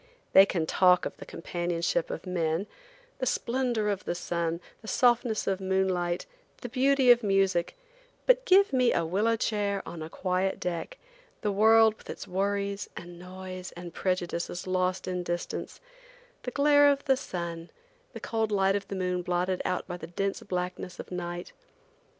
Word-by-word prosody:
They 195 +1 +9
can 170 -5 -1
talk 180 +2 +4
of - - -4
the - - -10
companionship 170 -1 -2
of - - -5
men, 170 0 -1 0.5
the 255 - -1
splendor 240 -3 0
of 200 -2 -1
the - - -2
sun, 170 -1 -2 0.2
the 220 - -12
softness 240 -2 +2
of 195 0 -1
moonlight, 185 -2 0 0.4
the 245 - -5
beauty 265 +1 +4
of 240 0 +5
music, 195 - +1 0.5
but - - +4
give 395 - +5
me 255 -2 +4
a 170 - +1
willow 205 +7 +1
chair 205 -3 -1
on 170 - -7
a 155 - -6
quiet 185 +2 -1
deck, 180 - -4 0.4
the 210 - 0
world 220 +2 +5
with - - -17
its - - -7
worries 200 +1 -1
and 175 0 -9
noise 185 0 -8
and 175 -1 -9
prejudices 175 -1 -2
lost 185 0 0
in 180 -1 -2
distance, 175 0 -4 0.6
the - - -4
glare 290 +2 +5
of 280 0 0
the 270 -2 +4
sun, 170 -7 -5 0.4
the - - -7
cold 225 -1 -1
light 195 -1 +3
of 200 -1 -3
the 195 - -5
moon 180 -1 -1
blotted 180 +1 -1
out 180 - -1
by 175 -1 -6
the 160 - -8
dense 195 +3 -2
blackness 180 -1 -4
of - - -8
night. 175 0 -5
190 Hz, 170 wpm, -28 LUFS, 175-220 Hz, 0.6 s, They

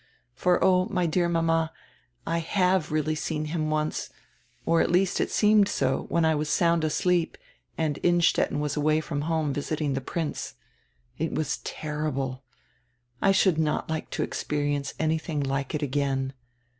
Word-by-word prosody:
For 180 +7 +2
oh, 185 -1 +4
my 180 -2 0
dear 170 +1 +1
mama, 165 -1 +1 0.5
I 165 0 0
have 180 -1 +1
really 155 0 0
seen 155 0 -2
him 155 -2 -1
once, 155 0 -1 0.6
or 165 0 +3
it - - +3
at - - -1
least 180 +1 +2
seemed 210 -1 +4
so, 205 - 0
when 170 -1 +2
I 160 - +4
was 150 0 -1
sound 170 -1 +2
asleep 170 +2 +1 0.4
and 155 -3 -1
Innstetten 175 -4 +2
was 150 -1 -1
away 155 +1 +2
from 150 -2 -3
home 155 -2 0
visiting 145 0 -2
die 135 - -1
Prince. 155 +3 -4 0.6
It 160 +1 -1
was 150 -2 -1
terrible. 145 -4 -3 0.8
I 195 - +5
should 190 -4 +3
not 155 0 0
like 160 - -3
to - - +1
experi 145 -1 -2
ence 140 -1 -4
anything 160 -1 -1
like 135 +2 -2
it 150 - -2
again. 135 -1 -1
155 Hz, 160 wpm, -26 LUFS, 150-170 Hz, 0.8 s, I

